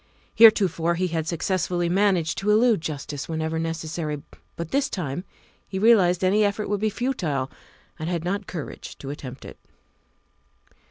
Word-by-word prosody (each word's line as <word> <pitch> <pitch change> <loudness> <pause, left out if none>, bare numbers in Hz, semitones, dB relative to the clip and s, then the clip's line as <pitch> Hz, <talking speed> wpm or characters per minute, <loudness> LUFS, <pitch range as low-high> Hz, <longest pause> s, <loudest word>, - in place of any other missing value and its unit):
Heretofore 185 -7 +5
he 180 +1 0
had 160 -1 -2
successfully 175 +1 0
managed 180 -3 +2
to 200 - -1
elude 220 -2 +4
justice 145 -3 -5
whenever 160 0 -2
necessary, 160 -2 -3 0.3
but 170 -1 -6
this 275 +1 +1
time 175 - -4 0.4
he 190 - -5
realized 190 -4 +4
any 200 +3 +4
effort 205 0 -1
would 205 -1 -1
be 215 - +2
futile 175 - -2 0.5
and 155 +2 -3
had 170 -2 -2
not 195 +3 -2
courage 165 -5 -7
to 135 - -6
attempt 135 -2 -8
it. - - -11
175 Hz, 150 wpm, -24 LUFS, 160-205 Hz, 0.5 s, Heretofore